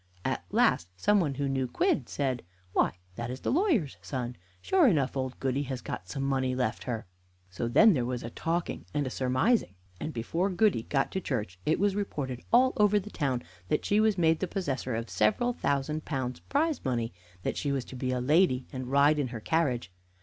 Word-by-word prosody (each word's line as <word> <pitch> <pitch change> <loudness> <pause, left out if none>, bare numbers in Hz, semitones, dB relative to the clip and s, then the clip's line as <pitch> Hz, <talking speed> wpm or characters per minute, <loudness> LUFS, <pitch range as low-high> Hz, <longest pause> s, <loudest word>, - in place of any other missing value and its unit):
At - - -1
last 85 - +3
some 205 - +3
one 150 -7 0
who 140 0 -1
knew 135 -1 0
Quidd 125 +1 +1
said: 130 -4 -1 0.3
"Why, - - +2 0.2
that 120 0 -3
is 130 +1 -6
the - - -1
lawyer's 280 - +2
son. 125 -3 -4 0.2
Sure 365 - +4
enough 145 - +2
old 130 -1 -3
Goody 135 +1 0
has 130 -2 -2
got 90 -5 -6
some 135 -2 -3
money 130 -2 0
left 125 -3 -1
her." 115 -3 -3 0.5
So 115 +5 -2
then 215 - +6
there 130 -6 +1
was 125 0 -3
a 115 - -6
talking 165 +5 -2
and 145 -3 0
surmising, 130 - +1 0.2
and 160 - -3
before 165 - -1
Goody 190 - +2
got 135 -2 +1
to 190 - -2
church 105 - -3
it 155 - +3
was 200 0 +2
reported 140 -11 -3
all 255 +2 +5
over 210 0 +4
the 210 +2 -9
town 130 -5 -1 0.2
that - - 0
she 205 - +3
was 215 -2 +3
made 165 -2 +3
the 185 - -1
possessor 135 - -2
of 115 +1 -3
several 175 - +2
thousand 150 - -1
pounds 130 -4 -3
prize 310 +2 0
money; 120 -5 -1 0.3
that - - -1
she 145 - -1
was 135 -3 -1
to - - -10
be 130 0 -2
a 130 0 0
lady, 135 -1 +3
and 130 -1 -4
ride 145 +2 +5
in 140 - 0
her 120 -2 -6
carriage. 125 - 0
135 Hz, 205 wpm, -29 LUFS, 125-180 Hz, 0.5 s, then